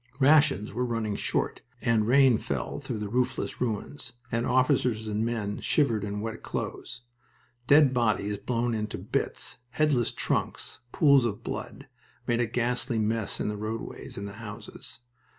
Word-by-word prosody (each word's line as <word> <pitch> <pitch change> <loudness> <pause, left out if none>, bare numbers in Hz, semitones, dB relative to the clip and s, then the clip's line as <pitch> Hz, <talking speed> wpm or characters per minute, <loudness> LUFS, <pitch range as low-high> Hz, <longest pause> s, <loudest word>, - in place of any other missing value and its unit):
Rations 145 -6 +4
were 125 +3 -1
running 115 -4 -1
short, - - -1 0.2
and 115 -4 +2
rain 130 -2 +6
fell - - -3
through - - -4
the 105 -1 -3
roofless 125 +4 -1
ruins, 125 +3 -3 0.2
and 115 +1 0
officers 125 -3 +2
and 105 +1 0
men 110 -3 -2
shivered 115 -9 +2
in 105 0 -3
wet 110 0 -5
clothes. 120 +1 -5 0.7
Dead 145 -1 +6
bodies 105 -4 +1
blown 120 -1 -1
into 105 -1 -3
bits, - - -3
headless 135 -3 +2
trunks, - - -2
pools 140 -4 +5
of 110 -4 -2
blood, - - -6 0.4
made 120 0 +1
a 120 - +1
ghastly 120 +1 0
mess 110 -1 0
in - - -1
the 105 0 -2
roadways 110 +2 -5
and 100 +1 -4
the 100 - -8
houses. 110 +2 -8
115 Hz, 150 wpm, -28 LUFS, 105-125 Hz, 0.7 s, rain